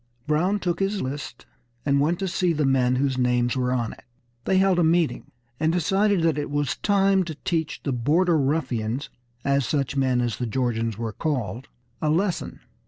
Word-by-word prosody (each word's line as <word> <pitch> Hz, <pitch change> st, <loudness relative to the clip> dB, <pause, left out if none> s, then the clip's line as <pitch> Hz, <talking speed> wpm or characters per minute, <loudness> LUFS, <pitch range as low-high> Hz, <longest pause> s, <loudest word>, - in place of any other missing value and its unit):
Brown 175 Hz, +7 st, +1 dB
took 175 Hz, -3 st, -2 dB
his 195 Hz, +1 st, 0 dB
list, 135 Hz, -3 st, -5 dB, 0.4 s
and 140 Hz, -1 st, +3 dB
went 165 Hz, +4 st, +1 dB
to 195 Hz, -, -2 dB
see 180 Hz, -1 st, +1 dB
the 150 Hz, -2 st, 0 dB
men 130 Hz, -2 st, +3 dB
whose 130 Hz, 0 st, 0 dB
names 125 Hz, 0 st, +1 dB
were 125 Hz, -1 st, 0 dB
on 120 Hz, -3 st, -1 dB
it. -, -, -16 dB, 0.4 s
They 190 Hz, -, +2 dB
held 190 Hz, -1 st, +3 dB
a -, -, +4 dB
meeting, 165 Hz, 0 st, +1 dB, 0.3 s
and 160 Hz, +1 st, +2 dB
decided 195 Hz, +2 st, +2 dB
that 160 Hz, -3 st, +2 dB
it 145 Hz, -, -3 dB
was 145 Hz, -2 st, -1 dB
time 195 Hz, -2 st, +3 dB
to 160 Hz, -2 st, -6 dB
teach 160 Hz, -3 st, -1 dB
the 140 Hz, -, -1 dB
"border 160 Hz, +9 st, +2 dB
ruffians," 135 Hz, -3 st, -1 dB, 0.3 s
as 140 Hz, 0 st, +2 dB
such 140 Hz, -1 st, -1 dB
men 130 Hz, -2 st, +2 dB
as 120 Hz, -2 st, -1 dB
the 125 Hz, -, -2 dB
Georgians 115 Hz, -2 st, -1 dB
were 115 Hz, -1 st, -4 dB
called, 125 Hz, -, -3 dB, 0.3 s
a 155 Hz, -, +1 dB
lesson. 175 Hz, +3 st, -1 dB
145 Hz, 185 wpm, -24 LUFS, 125-175 Hz, 0.4 s, a